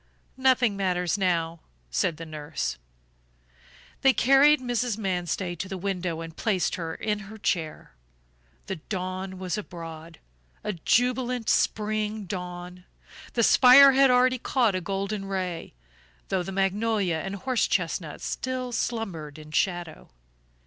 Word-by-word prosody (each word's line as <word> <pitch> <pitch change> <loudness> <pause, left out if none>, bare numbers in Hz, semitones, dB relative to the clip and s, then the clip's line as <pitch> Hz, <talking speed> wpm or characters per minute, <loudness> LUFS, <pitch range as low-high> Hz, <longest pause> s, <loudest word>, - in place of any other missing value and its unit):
"Nothing 255 -5 +3
matters 180 -3 0
now," 170 -4 0 0.3
said 150 - 0
the 165 - -7
nurse. 150 - -4 1.2
They 270 -1 +5
carried 275 +4 +5
Mrs. 245 -3 -1
Manstey 180 -3 -2
to 190 +3 -6
the 190 - -4
window 180 -3 -3
and 165 -1 -8
placed 195 -5 0
her 165 -2 -4
in 210 -1 -2
her 220 - -10
chair. 165 -6 -2 0.7
The 190 - -4
dawn 185 +2 -5
was 185 +1 -3
abroad, 165 -4 -9 0.5
a 210 - -2
jubilant 245 +5 +1
spring 215 0 0
dawn; 180 -1 -7 0.5
the 235 - +2
spire 265 +4 +8
had 270 0 +5
already 255 0 +4
caught 240 -4 +1
a 185 - -1
golden 195 +2 -3
ray, 185 - -4 0.5
though 190 - +1
the 180 - -5
magnolia 195 -1 0
and 195 +1 -4
horse 250 +3 0
chestnut 165 -3 -2
still 255 -1 -3
slumbered 190 -11 -3
in 155 0 -12
shadow. 175 -2 -2
195 Hz, 130 wpm, -26 LUFS, 175-230 Hz, 1.2 s, spire